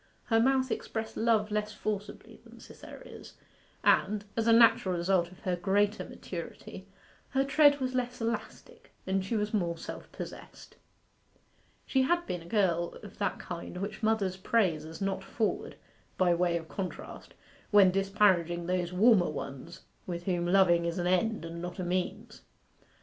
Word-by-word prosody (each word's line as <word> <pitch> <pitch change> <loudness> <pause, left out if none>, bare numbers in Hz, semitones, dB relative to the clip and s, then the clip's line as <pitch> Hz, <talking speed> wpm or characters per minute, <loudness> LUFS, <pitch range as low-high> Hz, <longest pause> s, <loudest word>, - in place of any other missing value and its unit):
Her 225 -1 +2
mouth 260 +1 +2
expressed 220 0 -4
love 220 -2 +2
less 210 0 -1
forcibly 210 -1 -5
than - - -15
Cytherea's, - - -12 0.5
and, 205 +1 +3
as 225 0 0
a - - +6
natural 225 -5 +5
result 175 0 +1
of 185 - -16
her 180 -1 -1
greater 205 +4 +1
maturity, - - -8 0.4
her 270 0 +1
tread 290 +1 +5
was 255 -1 -2
less 250 -1 -2
elastic, 230 0 -5
and 190 0 0
she 210 +5 -2
was 210 +1 -2
more 170 -5 0
self - - -8
possessed. - - -10 1.1
She 265 - +2
had 345 +6 +1
been 180 - -4
a 165 - -13
girl 175 -5 +1
of 205 0 -12
that 200 - -1
kind 175 0 -7
which 200 +4 -5
mothers 215 -4 +1
praise 185 -6 +1
as 160 +3 -10
not 195 -1 -2
forward, 220 -2 -2 0.4
by 180 -2 +4
way 170 0 +1
of 165 -1 -8
contrast, 185 +1 -7 0.3
when 200 -3 +6
disparaging 190 -3 +2
those 180 -1 -1
warmer 195 0 +4
ones 145 +2 -7 0.3
with 175 -1 -4
whom 175 -2 -1
loving 175 -2 +4
is 170 +1 -2
an 175 - -1
end 185 +1 +1
and 165 0 -7
not 175 0 -6
a 185 - -3
means. 180 +1 -3
195 Hz, 160 wpm, -30 LUFS, 175-220 Hz, 1.1 s, a